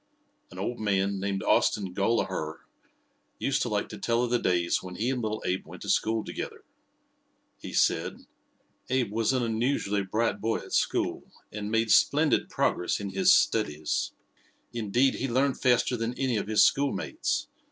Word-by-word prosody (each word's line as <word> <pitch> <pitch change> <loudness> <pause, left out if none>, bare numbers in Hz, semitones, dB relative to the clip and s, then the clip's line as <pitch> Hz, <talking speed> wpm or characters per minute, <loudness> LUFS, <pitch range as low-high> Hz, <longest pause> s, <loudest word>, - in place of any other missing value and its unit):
An 90 - -13
old 110 +6 -3
man, 100 -2 0
named 100 0 -2
Austin 95 -4 +2
Gollaher, 95 -6 -1 0.8
used - - 0
to - - 0
like - - -1
to - - -8
tell 115 +1 +1
of 120 - -2
the 120 - +3
days 85 -4 +1
when 90 -1 -8
he 120 +4 0
and 125 -2 -2
little 110 -1 -3
Abe 95 +1 -2
went - - -10
to - - 0
school 110 0 +1
together. - - -6 1.0
He - - -8
said: - - 0 0.6
"Abe 125 -5 0
was 115 +2 +1
an 130 -2 +1
unusually 115 -3 0
bright 110 +4 -1
boy 115 +1 0
at - - -9
school, - - 0 0.2
and 105 0 -5
made 115 0 +1
splendid - - +3
progress 90 - 0
in 100 -1 -5
his 185 -1 +4
studies. 80 - +1 0.6
Indeed, 120 +4 +2
he 135 - -3
learned 130 +2 +1
faster 125 -1 +3
than 115 +1 -3
any 130 -3 0
of 100 - -3
his 110 0 +5
schoolmates. 140 0 0
110 Hz, 165 wpm, -28 LUFS, 100-120 Hz, 1.0 s, his